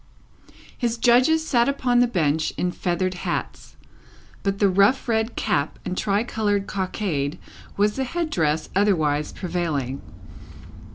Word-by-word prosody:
His 235 -2 -1
judges 255 +7 +4
sat 240 -4 +3
upon 255 -3 +1
the 245 - +5
Bench 160 -7 0
in 180 - 0
feathered 185 +1 -1
hats; 180 - -5 0.7
but 195 0 -1
the 200 - +4
rough 200 +9 +3
red 225 0 0
cap 140 +2 -1
and 180 - -3
tricoloured 205 0 0
cockade 180 -6 -2 0.4
was 210 +3 +2
the 265 - 0
head 325 +4 -3
dress 155 - 0
otherwise 155 -7 +2
prevailing. 160 -7 -3
200 Hz, 125 wpm, -23 LUFS, 170-235 Hz, 0.7 s, the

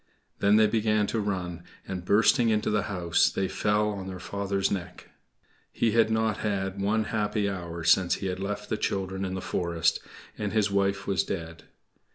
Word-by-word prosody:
Then 100 +1 +4
they 110 0 +6
began 110 -1 +2
to 110 - -2
run, 90 -4 -3 0.3
and, 90 -2 -4
bursting 115 +5 +4
into 105 -1 +1
the 105 0 +2
house, 90 -4 +2
they 95 - -1
fell 105 +2 +1
on 100 -2 -5
their 95 -1 -6
father's 100 +1 -2
neck. 90 -2 -5 0.6
He 115 - +1
had 115 0 +4
not 110 -1 +1
had 100 -2 -2
one 110 +3 +1
happy 105 -1 -1
hour 85 -4 -5
since 85 +2 +4
he - - -6
had 95 -1 -2
left 105 +2 -4
the 110 - 0
children 95 -1 -2
in 95 -1 -3
the 95 - -4
forest; 85 -3 0 0.4
and 105 -1 -2
his 105 -2 +2
wife 100 0 +1
was 100 - +1
dead. 85 -3 -6
100 Hz, 185 wpm, -27 LUFS, 95-105 Hz, 0.6 s, they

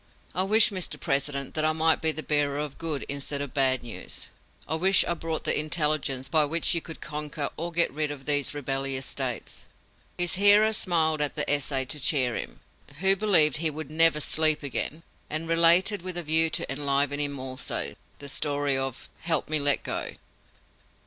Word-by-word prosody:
"I 185 - +1
wish, 215 +3 +4
Mr. 185 -3 -4
President, 140 -2 -3
that 155 - -2
I 155 0 +1
might 160 0 +1
be 160 - +2
the 155 0 -7
bearer 145 -1 0
of 150 -2 -6
good 155 -4 -2
instead 140 0 -4
of 140 -2 -6
bad 130 -3 +1
news 120 - -5 0.4
I - - -2
wish 185 +4 +4
I - - -1
brought 165 -1 -5
the - - +2
intelligence 150 -4 0
by 155 +3 +3
which 165 +3 0
you 170 - -1
could 165 - -10
conquer 150 -1 -4
or 170 +2 -5
get 170 0 +3
rid 150 0 -1
of 140 -2 -9
these 145 0 0
rebellious 135 -1 -3
States!" 130 -4 -4 0.5
His 175 -2 0
hearer 210 +2 +6
smiled 160 -6 0
at 145 - -1
the - - -1
essay 140 -2 +2
to 150 +4 -5
cheer 130 -4 +2
him, - - -8 0.4
who 190 +4 +3
believed 185 -7 +5
he 160 0 0
would 155 -1 -8
"never 165 -1 +4
sleep 155 0 +2
again," 145 +3 -3 0.3
and 155 +2 -2
related, 170 +5 +4
with 185 0 -7
a 175 - -4
view 160 +1 +3
to - - -2
enliven 140 0 -1
him 145 -1 -2
also, 130 0 -4 0.2
the 140 - -10
story 145 0 -1
of 135 -2 -4
"Help 160 -3 -1
me 155 0 +1
let 145 -1 +1
go." - - -4
150 Hz, 190 wpm, -25 LUFS, 140-165 Hz, 0.5 s, hearer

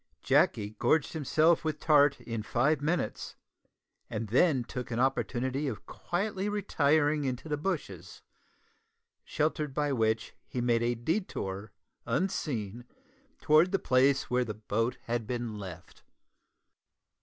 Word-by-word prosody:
Jacky 105 0 +2
gorged 155 -2 +2
himself 160 +2 +2
with 155 -1 -2
tart 145 -3 +4
in 115 -2 -4
five 135 +7 +1
minutes, 165 +4 -2 0.7
and 110 0 -4
then 135 - +3
took 125 +1 -6
an 120 -1 -2
opportunity 130 +1 0
of 110 -7 -5
quietly 195 +2 -3
retiring 155 -7 +2
into 130 +2 -3
the 150 - 0
bushes, 175 +7 -5 1.0
sheltered 150 -2 -1
by 145 -1 +1
which 110 -2 0
he 125 - -4
made 120 -1 +2
a 120 +1 +1
detour 115 - -3 0.4
unseen 120 - -2 0.6
towards 155 +4 +5
the 195 - +1
place 135 -3 +3
where 125 0 +1
the 110 -3 -5
boat 110 +2 -1
had 115 -2 -2
been 120 -3 -3
left. 90 -3 -10
130 Hz, 125 wpm, -30 LUFS, 115-155 Hz, 1.0 s, towards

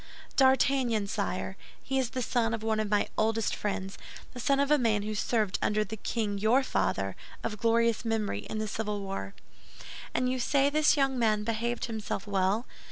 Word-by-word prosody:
"D'Artagnan, 260 -4 +3
sire; 200 -2 -3 0.3
he 270 0 0
is 255 -3 0
the 255 0 -3
son 230 -1 +1
of 220 - -8
one 220 -1 +1
of 215 -1 -1
my 205 0 +2
oldest 225 0 +1
friends—the 195 +4 -6
son 275 +3 +2
of 280 +1 +2
a 300 - +5
man 215 -4 +2
who 215 +1 -3
served 215 -2 0
under 215 0 +2
the 215 +1 -6
king 210 -1 -2
your 230 +6 +4
father, 95 - -1 0.3
of 215 -2 -3
glorious 230 0 +2
memory, 220 - -1
in - - -3
the 215 0 -2
civil 210 -1 -3
war." 195 - -5 0.8
"And 250 - +2
you 255 0 0
say 275 +3 +2
this 305 0 +4
young 270 -2 +2
man 215 -2 +2
behaved 230 +2 -1
himself 220 -3 -4
well? 200 +3 +1
225 Hz, 180 wpm, -29 LUFS, 210-250 Hz, 0.8 s, a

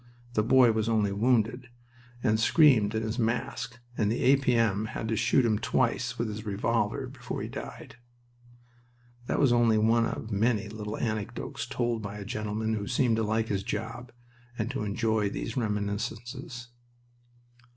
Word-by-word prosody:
The 110 - +3
boy 125 +2 +5
was 110 0 0
only 105 -3 +2
wounded, 120 +3 +1 0.5
and 110 -3 +2
screamed 115 -5 +5
in 110 - 0
his 110 +3 -3
mask, 120 +1 -2 0.2
and 105 -2 +1
the 115 - -1
A.P.M. 115 -6 +3
had 110 0 -4
to 115 - +1
shoot 120 +3 +3
him 110 -2 +2
twice 120 0 0
with 115 - -1
his 105 0 -5
revolver 100 -2 -1
before - - -6
he - - -4
died. - - -8 1.3
That - - 0
was 135 -4 +4
only 120 -2 +4
one 115 +2 +3
of 110 - -5
many 105 +1 +1
little 105 0 -5
anecdotes 110 -3 -3
told 120 -2 -1
by 100 0 -6
a 100 - -7
gentleman 110 +1 -2
who 100 -2 -3
seemed 120 -2 +2
to 110 - +1
like 110 +1 0
his 100 -2 0
job 115 +3 -5 0.5
and 115 +2 -2
to 135 - -3
enjoy 105 0 0
these 115 +3 -5
reminiscences. 120 +4 -3
110 Hz, 160 wpm, -28 LUFS, 105-120 Hz, 1.3 s, boy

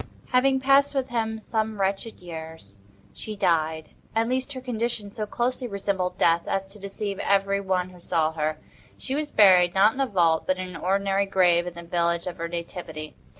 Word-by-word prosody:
Having 265 +1 +3
passed 275 +2 +4
with 265 -1 -1
him 220 -2 -2
some 220 -1 -2
wretched 195 +3 -1
years, 160 - -9 0.3
she 215 - -7
died—at 165 +4 -1
least 260 +3 -1
her 260 - -6
condition 235 -4 -3
so 215 -1 -4
closely 250 +3 -1
resembled 195 -3 -2
death 170 0 +3
as 195 0 -1
to 210 +2 -12
deceive 200 0 -5
every 200 0 +1
one 185 -1 -1
who 180 - -15
saw 165 -2 0
her. 155 -1 -2 0.4
She 265 - -5
was 295 +1 -2
buried——not 190 +1 +5
in 275 - -3
a 270 - +2
vault, 170 -6 +2
but 185 - +1
in 185 0 -5
an 180 - -10
ordinary 195 +3 0
grave 180 -2 +3
in 175 - -6
the 170 - -8
village 170 0 0
of 180 - -5
her 170 0 -3
nativity. 165 -3 -6
195 Hz, 185 wpm, -25 LUFS, 170-220 Hz, 0.4 s, buried——not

